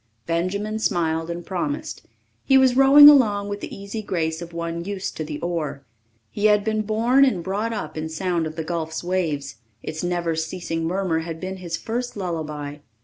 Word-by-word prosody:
Benjamin 200 +6 -1
smiled 165 -5 0
and 170 0 -5
promised. 290 +10 -4 0.4
He 270 - +5
was 260 -2 +4
rowing 275 +2 +9
along 210 -8 +5
with 205 0 -4
the - - -6
easy 200 +2 -6
grace 165 -5 -2
of 170 0 -8
one 170 0 -4
used 195 0 -4
to 155 - -2
the 150 -1 -6
oar. 160 -5 -3 0.5
He 205 - -2
had 210 -1 +5
been 215 0 0
born 230 +5 +3
and 205 -11 +2
brought 205 +5 -2
up 155 -9 -5
in 160 0 -4
sound 170 0 -1
of 155 - -8
the 160 - -3
gulf's 160 -1 -3
waves; 155 -9 -2 0.3
its 160 +2 -5
never 175 -2 -1
ceasing 165 0 -3
murmur 180 -2 0
had 165 0 -6
been 190 +1 -5
his 175 -2 -4
first 240 0 -4
lullaby. 155 -6 -4
175 Hz, 185 wpm, -23 LUFS, 160-210 Hz, 0.5 s, rowing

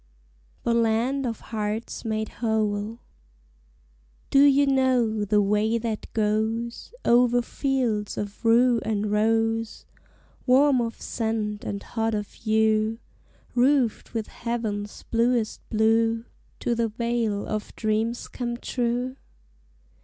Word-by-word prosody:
THE 235 - +1
LAND 235 +4 +1
OF 225 -2 -4
HEARTS 215 0 -4
MADE 220 -1 -1
WHOLE 215 -1 0 1.3
Do 275 - +6
you 285 0 +5
know 255 -5 +2
the 205 0 +3
way 210 +3 +2
that 225 -2 -4
goes 220 +2 -1
Over 245 0 +4
fields 240 -7 -1
of 205 +2 -5
rue 235 +1 +4
and 210 -1 -1
rose, 225 +1 +1 0.6
Warm 265 0 +5
of 230 -1 -4
scent 220 -2 -2
and 200 0 -4
hot 225 -1 -1
of 205 -1 -4
hue, 220 0 +1 0.6
Roofed 250 -2 +2
with 220 -1 -1
heaven's 215 -3 -4
bluest 230 -1 0
blue, 225 +1 +2 0.4
To 240 - +1
the 230 0 +1
Vale 225 -2 -1
of 215 -1 -4
Dreams 220 +2 -1
Come 240 -1 -4
True? 245 +1 -2
225 Hz, 115 wpm, -25 LUFS, 215-240 Hz, 1.3 s, Do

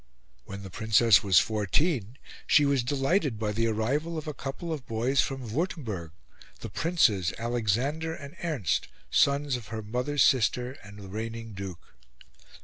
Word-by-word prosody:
When 100 0 -8
the 95 - -9
Princess 110 +1 +5
was 95 -3 +3
fourteen 110 - +1 0.3
she 150 - +5
was 140 -2 +2
delighted 140 - 0
by 105 -1 -1
the 115 +2 0
arrival 140 +10 -1
of 155 - -5
a 150 - -3
couple 140 +5 -5
of 140 -4 -7
boys 120 +5 +2
from 130 -5 -4
Wurtemberg, 120 - -3 0.5
the - - -6
Princes 110 - +2
Alexander 120 +8 -1
and 140 -2 -10
Ernst, 150 - 0 0.2
sons 140 -1 +3
of 120 -3 -7
her 110 -1 -5
mother's 125 +5 +1
sister 125 0 +2
and 100 +1 -12
the 100 -2 -9
reigning 115 +2 -5
duke. 95 -3 -8
120 Hz, 150 wpm, -28 LUFS, 105-145 Hz, 0.5 s, Princess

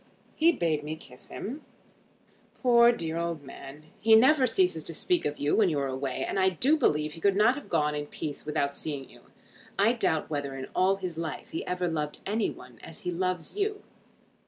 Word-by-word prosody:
"He 330 +2 +4
bade 160 - 0
me 155 +1 -4
kiss 125 -5 -12
him." 270 +8 -6 1.0
"Poor 235 -2 +6
dear 165 -8 -3
old 170 -3 -3
man. 140 +2 -11 0.2
He 220 +1 +6
never 260 +3 +5
ceases 180 -8 +1
to 165 - -5
speak 360 - +1
of 150 - -1
you 145 +1 +1
when 205 -4 +4
you 155 - -1
are 140 - 0
away, 130 0 -3
and - - -1
I 190 0 +4
do 255 - +2
believe 150 - +1
he 165 - -11
could 200 +1 +3
not 215 +4 +5
have 290 +1 -9
gone 150 -3 +1
in 145 0 -3
peace 145 -1 -6
without 140 -2 -1
seeing 140 -2 -5
you. - - -17 0.6
I 210 +4 +4
doubt 160 -10 0
whether 145 -3 -3
in 130 0 -6
all 190 +1 +3
his 180 -4 -5
life 165 -2 -5
he - - -3
ever 180 0 -1
loved 150 -3 -2
any 210 +1 0
one 125 -2 -12
as 165 - -10
he 180 - -2
loves 180 - -2
you. 410 0 -2
170 Hz, 205 wpm, -28 LUFS, 150-220 Hz, 1.0 s, Poor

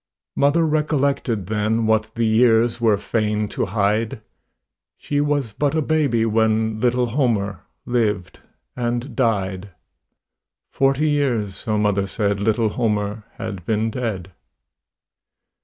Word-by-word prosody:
Mother 145 +4 +3
recollected 140 - 0
then 110 +3 0
What 110 0 +2
the 115 0 +1
years 115 +1 +3
were 110 -3 +4
fain 105 0 -1
to - - -2
hide 110 +3 0 0.8
She 145 0 -1
was 145 -5 0
but 145 +7 -1
a 160 - +2
baby 140 -8 +1
when 110 0 +1
Little 125 +1 +2
Homer 110 - 0 0.3
lived 105 -6 -1 0.4
and 120 +1 -3
died; 100 -5 -1 1.0
Forty 135 +3 +2
years, 120 -9 0
so 110 -1 -2
mother 100 -2 +1
said, 100 0 -1
Little 110 +1 +1
Homer 105 -2 -1
had 105 -5 -6
been 110 +3 0
dead. 105 -7 -4
110 Hz, 120 wpm, -21 LUFS, 105-125 Hz, 1.0 s, were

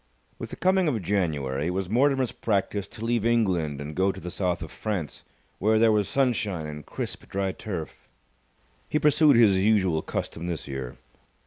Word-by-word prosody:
With - - -6
the - - -7
coming 185 -1 +2
of 125 -7 +1
January, 75 -7 -1
it 90 - -2
was 95 -1 -1
Mortimer's 130 +3 +2
practice 100 -2 -1
to 110 - -8
leave 115 -2 +1
England 95 -11 +1
and 75 +2 -6
go 95 +4 +2
to - - -9
the 90 +1 -6
South 90 -2 -1
of 80 - -8
France, 100 -9 -4 0.4
where 110 +3 +3
there 110 0 +5
was 105 -2 +1
sunshine 110 - 0
and 75 0 -7
crisp - - -6
dry 95 0 -1
turf. 90 -5 -7 0.8
He - - +1
pursued 150 -1 +5
his 110 -4 +6
usual 95 -6 +3
custom 85 +1 -4
this 85 -4 -4
year. 65 -3 -6
95 Hz, 180 wpm, -26 LUFS, 80-115 Hz, 0.8 s, his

